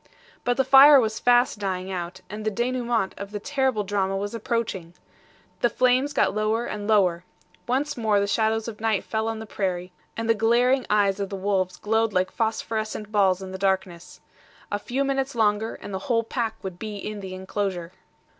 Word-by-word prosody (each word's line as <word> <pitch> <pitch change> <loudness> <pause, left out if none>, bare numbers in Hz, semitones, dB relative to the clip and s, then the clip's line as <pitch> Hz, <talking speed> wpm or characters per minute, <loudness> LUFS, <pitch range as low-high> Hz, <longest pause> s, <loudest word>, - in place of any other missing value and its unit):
But 245 0 0
the 265 - +4
fire 275 +2 +8
was 220 -3 -1
fast 245 -2 +3
dying 190 -1 -3
out, 175 -1 -5
and 210 +1 -7
the 215 - +1
DENOUEMENT 240 -2 -1
of 200 0 -6
the 205 0 -5
terrible 265 -2 0
drama 195 -1 -1
was 205 +2 -4
approaching. 215 -7 -3 0.6
The 240 - +3
flames 255 +4 +2
got 290 - +2
lower 215 +3 0
and 205 -3 -5
lower. 185 -5 +3 0.4
Once 280 +4 0
more 220 -4 +2
the 200 - +1
shadows 220 +2 0
of 215 -2 -7
night 220 -3 +1
fell 220 0 -2
on 225 0 -2
the 220 - -7
prairie, 185 -4 -3 0.3
and 230 0 -2
the 230 - +5
glaring 240 +4 +2
eyes 205 -2 +2
of 200 -1 -2
the 200 - -4
wolves 190 -1 -1
glowed 225 0 0
like 185 0 +1
phosphorescent 220 -1 -2
balls 195 -3 +2
in 190 - -7
the 190 - -6
darkness. 190 -3 -2 0.5
A 205 - -1
few 255 +6 -2
minutes 270 -1 -1
longer, 220 0 +1
and 205 - -9
the 190 - -2
whole 230 -1 +3
pack 225 -1 -2
would 185 -2 -6
be 215 -1 -5
in 210 +1 -5
the 190 -1 -7
inclosure. 190 -2 -3
215 Hz, 190 wpm, -25 LUFS, 195-235 Hz, 0.6 s, fire